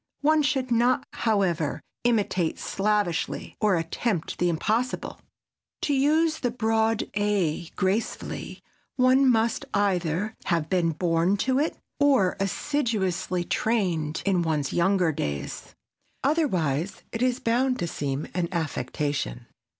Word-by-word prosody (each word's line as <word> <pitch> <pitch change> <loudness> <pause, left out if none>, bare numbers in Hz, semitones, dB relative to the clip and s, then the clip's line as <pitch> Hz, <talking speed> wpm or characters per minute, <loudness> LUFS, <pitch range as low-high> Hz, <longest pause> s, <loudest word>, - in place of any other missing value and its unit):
One 310 +1 +4
should 270 -4 0
not, 240 +2 +3
however, 185 -9 0 0.2
imitate 205 -8 +1
slavishly 200 -4 -1
or 210 -3 +4
attempt 165 +2 -2
the 175 - +2
impossible. 220 +9 -1 0.6
To 290 - +1
use 310 +4 +2
the 245 - 0
"broad 225 -1 +1
a" 200 -6 0
gracefully 195 +5 -2 0.3
one 260 0 +5
must 230 +2 +2
either 195 0 0
have 165 -3 0
been 170 -3 +2
born 170 +3 +1
to 260 0 +2
it 305 - 0 0.2
or 270 -10 +4
assiduously 195 - -1
trained 170 -8 0
in 190 -3 +2
one's 155 -4 -1
younger 180 -1 +3
days. 70 - -5 0.5
Otherwise 190 - 0
it 230 - -4
is 255 0 +2
bound 250 +3 +1
to 175 - -2
seem 140 -2 -3
an 170 -1 -1
affectation. 145 - -2
200 Hz, 120 wpm, -26 LUFS, 170-245 Hz, 0.6 s, one